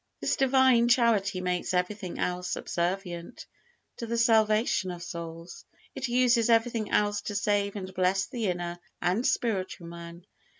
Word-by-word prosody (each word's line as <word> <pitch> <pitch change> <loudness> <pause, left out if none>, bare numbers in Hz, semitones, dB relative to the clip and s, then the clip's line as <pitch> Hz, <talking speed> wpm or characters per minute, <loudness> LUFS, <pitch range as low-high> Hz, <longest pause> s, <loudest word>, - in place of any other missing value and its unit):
This - - 0
Divine 260 -3 +4
Charity 225 -6 +2
makes 180 0 -1
everything 180 0 -2
else 180 0 -2
subservient 175 -1 -3 0.5
to 235 - -5
the 235 +1 -2
salvation 220 -3 +3
of 175 -1 -6
souls; 170 -1 -8 0.3
it 265 - -3
uses 240 -1 +3
everything 230 -2 +2
else 205 0 +1
to 205 - -5
save 200 0 0
and 190 -2 -6
bless 185 +1 +1
the 235 -5 -3
inner 175 -1 -3 0.2
and 185 +8 +1
spiritual 190 -6 -1
man. 170 +1 -10
200 Hz, 140 wpm, -28 LUFS, 180-230 Hz, 0.5 s, Divine